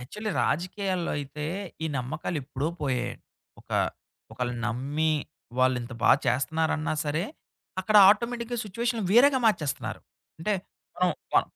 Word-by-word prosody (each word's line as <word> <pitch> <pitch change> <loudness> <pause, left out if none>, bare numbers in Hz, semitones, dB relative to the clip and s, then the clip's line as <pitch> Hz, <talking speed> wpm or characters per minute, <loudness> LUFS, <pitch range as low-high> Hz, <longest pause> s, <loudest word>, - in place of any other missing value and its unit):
Actually 210 - -5
రాజకీయాల్లో 185 +1 -1
అయితే 145 +1 -5 0.4
ఈ - - +1
నమ్మకాలు 150 +6 -3
ఎప్పుడో 135 +3 -2
పోయాయండి. 125 -3 -2 0.4
ఒకా - - -1 0.5
ఒకళ్ళను 125 -1 -3
నమ్మి 145 +6 0 0.5
వాళ్ళింత 130 -1 +2
బాగ - - +8
చేస్తున్నారన్నా 155 +5 +1
సరే, 155 +3 0 0.6
అక్కడ 210 +3 +3
ఆటోమేటిక్‌గా 235 +2 0
సిచ్యువేషనులు 230 +2 -1
వేరేగా 265 +3 +6
మార్చేస్తున్నారు. 155 -10 0 0.4
అంటే, 210 +6 0 0.4
మనం 180 0 +3 0.2
మన - - +7
160 Hz, 115 wpm, -27 LUFS, 130-210 Hz, 0.6 s, బాగ